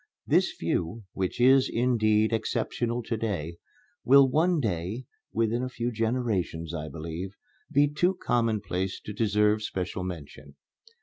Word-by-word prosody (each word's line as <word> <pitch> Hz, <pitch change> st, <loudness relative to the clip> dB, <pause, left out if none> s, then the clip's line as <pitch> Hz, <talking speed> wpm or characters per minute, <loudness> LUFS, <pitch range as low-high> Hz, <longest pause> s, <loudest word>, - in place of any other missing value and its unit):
This -, -, +3 dB
view, 100 Hz, +7 st, -2 dB
which 95 Hz, +3 st, -2 dB
is, 130 Hz, +2 st, +5 dB
indeed, 110 Hz, -2 st, +2 dB
exceptional 115 Hz, +1 st, -1 dB
to 115 Hz, +1 st, -2 dB
day, 90 Hz, -7 st, -3 dB, 0.5 s
will 135 Hz, +1 st, +7 dB
one 165 Hz, +5 st, +2 dB
day 105 Hz, -, -2 dB, 0.3 s
(within 115 Hz, +1 st, 0 dB
a 130 Hz, -, -2 dB
few 120 Hz, -1 st, -3 dB
generations, 110 Hz, -8 st, -1 dB
I 80 Hz, -2 st, -4 dB
believe) 85 Hz, +4 st, -6 dB, 0.4 s
be 145 Hz, +1 st, +4 dB
too 175 Hz, +6 st, +1 dB
commonplace 110 Hz, -, -1 dB
to 105 Hz, -, -8 dB
deserve 105 Hz, 0 st, +2 dB
special 95 Hz, -3 st, -3 dB
mention. 75 Hz, -5 st, -8 dB
110 Hz, 130 wpm, -27 LUFS, 90-120 Hz, 0.5 s, will